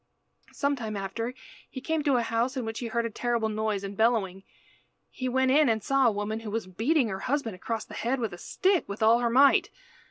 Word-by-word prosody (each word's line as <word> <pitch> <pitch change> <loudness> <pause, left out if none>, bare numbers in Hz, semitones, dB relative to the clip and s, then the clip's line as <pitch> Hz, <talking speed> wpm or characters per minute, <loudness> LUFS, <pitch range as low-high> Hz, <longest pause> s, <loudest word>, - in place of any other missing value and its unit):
Some 280 0 0
time 220 -5 -5
after 225 +6 -4 0.3
he - - -7
came 320 +3 -1
to 280 -3 +3
a 240 - +2
house 230 +4 -1
in 250 - -2
which 225 0 -4
he 240 - -4
heard 235 +1 -1
a - - -1
terrible 235 -1 -1
noise 215 -2 -2
and 200 0 -6
bellowing. 210 -4 +1 0.7
He 255 0 -3
went 260 +1 +2
in 295 -1 +5
and 220 -2 0
saw 275 0 +3
a - - +4
woman 210 +1 -3
who 225 -1 -7
was 225 0 -3
beating 230 - +1
her 190 -1 -4
husband 255 -2 -1
across 220 +4 -4
the - - -13
head 250 +3 -1
with 225 -6 -2
a 175 - -9
stick 375 - 0
with 200 +2 -3
all 225 +2 +5
her 240 -1 +1
might. 270 +4 +5
230 Hz, 230 wpm, -27 LUFS, 215-260 Hz, 0.7 s, in